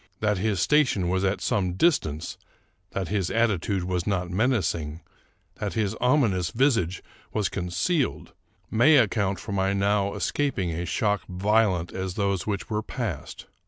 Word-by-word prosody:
That 105 -3 +1
his 105 -2 0
station 130 - +2
was 95 +1 0
at 95 +1 0
some 90 -3 0
distance, 85 - +1 0.5
that 95 -3 -3
his 100 -3 0
attitude 100 -5 +1
was 90 -1 -2
not 90 -3 -1
menacing, 90 - 0 0.6
that - - -3
his 105 -3 0
ominous 120 - +2
visage 115 - +1 0.3
was 105 -2 0
concealed, 100 - -1 0.4
may 130 +8 +6
account 100 -5 +2
for - - -7
my 95 0 +1
now 100 0 +1
escaping 120 -12 -1
a 85 +2 -3
shock 105 +3 0
vio 105 +3 +3
lent 85 0 -5
as 95 -1 -4
those 100 -1 -1
which 100 -2 -2
were 105 -1 -1
past. 110 - -5
100 Hz, 150 wpm, -26 LUFS, 90-110 Hz, 0.6 s, may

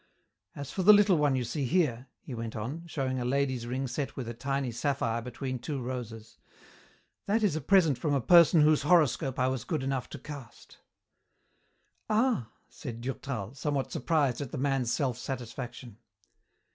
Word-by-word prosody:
As 140 -1 -6
for 190 - -2
the 210 +3 +8
little 205 -2 +5
one 145 -2 +3
you 130 - 0
see 120 +5 -3
here," 135 -5 +1 0.2
he 135 - -8
went 115 -1 -5
on, 140 +11 -5
showing 130 -5 -2
a - - -2
lady's 130 -2 0
ring 130 +2 -2
set 135 +3 -4
with 130 -4 -5
a 120 - -4
tiny 135 +1 -2
sapphire 115 -2 -1
between 130 +2 -5
two 140 +3 -4
roses, 115 -3 -6 0.9
"that 215 +3 +2
is 195 -7 +2
a 160 - -2
present 165 -4 +4
from 145 -3 0
a - - +2
person 170 +4 +6
whose 150 0 +4
horoscope 145 -5 +3
I 130 - +2
was 130 -3 -2
good 155 -5 -2
enough 135 -2 -2
to - - -7
cast." 140 -3 -11 1.3
"Ah!" 220 - +2 0.2
said 115 -5 -8
Durtal, 125 -4 -4
somewhat 140 -1 -2
surprised 140 -3 +1
at 140 - -4
the - - -4
man's 135 -3 0
self 125 -3 -1
satisfaction. 120 -3 -6
135 Hz, 170 wpm, -29 LUFS, 120-150 Hz, 1.3 s, the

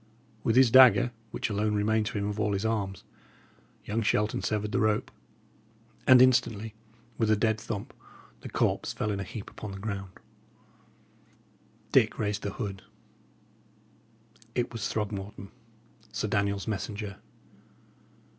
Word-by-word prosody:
With 115 - +2
his 130 -2 +6
dagger, 120 -3 +7 0.2
which - - -3
alone 105 +1 0
remained 105 +1 +1
to 110 - -3
him 100 - -1
of 105 +1 -3
all 105 -1 +1
his 100 +2 -1
arms, 100 -4 -2 0.8
young 110 +3 -1
Shelton 105 0 +1
severed 105 -1 -1
the - - +1
rope, 110 -1 +1 1.0
and 130 -1 +9
instantly, 115 -4 +2 0.5
with 110 -2 +2
a 110 - +5
dead 110 0 +1
thump, 105 -3 -5 0.5
the - - -8
corpse - - 0
fell 105 - -2
in 100 - -2
a - - -2
heap 100 +3 -8
upon 105 -2 -7
the - - -7
ground. 100 -2 -5 1.8
Dick - - +4
raised 105 -1 -1
the 100 - -4
hood; 100 -4 -5 1.7
it 120 -1 -1
was 115 -3 -2
Throgmorton, 100 -2 -4 0.6
Sir 110 -1 -2
Daniel's 100 0 0
messenger. 105 -1 -4
105 Hz, 135 wpm, -28 LUFS, 100-110 Hz, 1.8 s, and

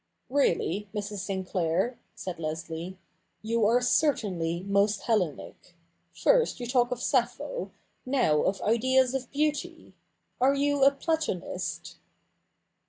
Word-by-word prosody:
' - - -49
Really, 210 - +1
Mrs. 205 -1 -4
Sinclair,' 190 +2 -1 0.2
said 180 -3 -6
Leslie, 165 +3 -5 0.2
' - - -47
you 225 -1 +2
are 240 +3 +3
certainly 185 - +1
most 200 +1 +2
Hellenic. 180 -4 -2 0.4
First - - +2
you 245 - -4
talk 245 0 +2
of 250 - -3
Sappho, 260 - -1 0.3
now 250 - +2
of 195 0 0
Ideas 255 +3 +3
of 260 -2 -3
Beauty. 305 +3 -2 0.5
Are 265 +3 +4
you 285 0 +2
a 275 - +9
Platonist 310 - -3
230 Hz, 120 wpm, -28 LUFS, 185-270 Hz, 0.5 s, a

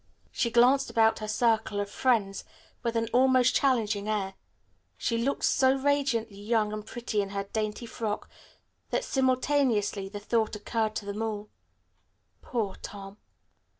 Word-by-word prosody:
She 235 - 0
glanced 250 +4 +4
about 225 -1 +3
her 215 - -5
circle 220 -1 +1
of 205 - -1
friends 205 -3 0 0.4
with 235 -1 -2
an 230 0 +1
almost 255 0 +4
challenging 215 -6 +1
air. 195 -3 -1 0.6
She 230 - -1
looked 270 +4 -1
so 265 0 +4
radiantly 265 -7 0
young 215 -1 +1
and 215 0 -4
pretty 230 -2 -2
in 200 - -4
her 200 0 -3
dainty 215 +2 -3
frock 220 -2 -4 0.6
that - - 0
simultaneously 255 -7 +1
the 205 +1 -6
thought 220 +1 0
occurred 215 +1 -2
to 205 - -4
them 205 +2 -4
all, 210 -2 -3 0.9
"Poor 220 -6 -3
Tom." 195 0 -9
220 Hz, 145 wpm, -28 LUFS, 205-245 Hz, 0.9 s, glanced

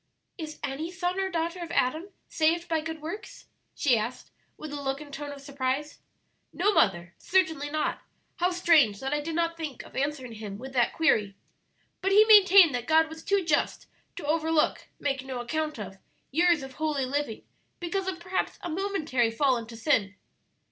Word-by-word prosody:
'" - - -51
"Is 305 0 -10
any 290 +5 -3
son 360 0 -2
or 385 0 0
daughter 340 0 -2
of 345 - -6
Adam 315 +10 0 0.2
saved 335 +2 +1
by 325 -2 0
good 320 -1 -6
works?" 345 +7 -7 0.3
she 250 -7 +3
asked, 235 +4 -5 0.3
with 310 -2 -8
a 290 - -4
look 270 0 -2
and 295 -2 -11
tone 290 +1 -5
of 280 -1 -9
surprise. 275 +1 -3 0.5
"No, 410 +4 +1
mother, 175 - +2
certainly 320 -6 +1
not; 310 +1 -1 0.4
how 355 +1 +2
strange 320 - +4
that 270 +2 -3
I 295 - 0
did 320 +2 -4
not 335 0 0
think 305 -6 -6
of - - -15
answering 270 -2 -2
him 210 -3 -7
with 260 +4 -9
that 245 -2 +2
query. 210 -11 +2 0.7
But 390 +1 +1
he 425 +2 +8
maintained 395 - +8
that 245 -1 -3
God 320 0 +4
was 320 0 -10
too 400 -2 +1
just 300 -3 0 0.3
to 340 - -7
overlook 320 +1 +1
make 275 -2 -1
no 260 -2 -5
account 305 +4 -2
of 195 -2 -8 0.3
years 335 0 +3
of 265 0 -9
holy 300 -2 -1
living 275 -4 -3 0.4
because 375 +2 -2
of 370 -1 -3
perhaps 370 +2 -2
a 350 - -4
momentary 315 - 0
fall 260 +3 +2
into 230 -1 -6
sin." 220 -6 +1
305 Hz, 185 wpm, -27 LUFS, 265-340 Hz, 0.7 s, he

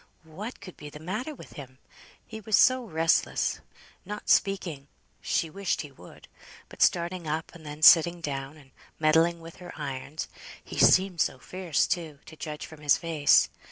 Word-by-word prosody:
what 190 +10 -8
could 185 -3 -11
be 150 - -10
the 150 - -11
matter 215 - -5
with - - -13
him? 130 -2 -11 0.5
He 220 -1 -9
was 215 0 +1
so 255 0 +4
restless; 165 -4 +1 0.4
not 210 +2 -7
speaking 170 -8 +1 0.3
(she 165 - 0
wished 195 +3 -2
he 150 - -10
would), 90 -10 -16 0.4
but - - -12
starting 170 -1 +1
up 155 +2 -3
and 160 -3 -13
then 150 +1 -8
sitting 170 +2 +7
down, 140 -1 -5
and 135 -3 -19 0.3
meddling 165 +2 +3
with 165 0 -12
her 180 -1 -10
irons; 140 +1 -5 0.4
he - - -7
seemed 185 -3 +4
so - - 0
fierce, 175 +3 -1
too, 165 -5 -3
to 160 - -12
judge 150 -1 -6
from 160 -1 -13
his 145 -2 +4
face. 160 -4 +3
165 Hz, 170 wpm, -27 LUFS, 150-185 Hz, 0.5 s, sitting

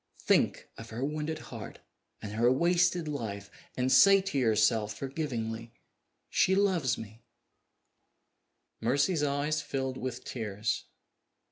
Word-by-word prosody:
Think - - +2
of 115 0 -9
her 120 +4 -3
wounded 155 +2 -3 0.2
heart - - -8 0.5
and 105 - -5
her 120 +3 +3
wasted 170 +3 +2
life 100 -8 -5 0.3
and 130 +1 +1
say 195 +10 +7
to 190 -6 -3
yourself 110 -2 +2
forgivingly, 115 -6 -4 0.5
She 190 - +3
loves 185 -9 +2
me!" 110 +1 -10 1.6
Mercy's 140 +8 +1
eyes 145 +2 0
filled 135 -3 -3
with 125 -1 -5
tears. 105 -2 -3
130 Hz, 115 wpm, -30 LUFS, 115-155 Hz, 1.6 s, say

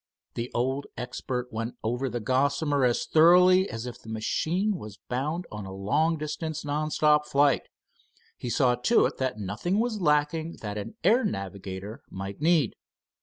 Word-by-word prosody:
The 120 +1 -4
old 130 +3 -1
expert 125 0 -4
went 115 +2 -3
over 125 +4 -1
the 120 0 -3
Gossamer 140 +4 +1
as 120 -1 +1
thoroughly 180 +4 +6
as 115 +1 -5
if 125 - -7
the 110 - -12
machine 175 - -1
was 105 -1 -9
bound 150 - -3
on 105 -2 -6
a - - -7
long 145 +13 +1
distance 155 0 -4
non 150 +1 -1
stop 150 -1 +3
flight. 145 -1 +3 0.7
He 125 - -6
saw 125 0 +3
to 125 - +3
it - - -2
that 130 -3 -1
nothing 105 - -2
was 220 -2 0
lacking 155 +1 +1
that 105 -2 -4
an 105 - -7
air 225 +9 +4
navigator 100 - -5
might 95 +5 -7
need. 160 -7 +3
135 Hz, 165 wpm, -27 LUFS, 115-160 Hz, 0.7 s, thoroughly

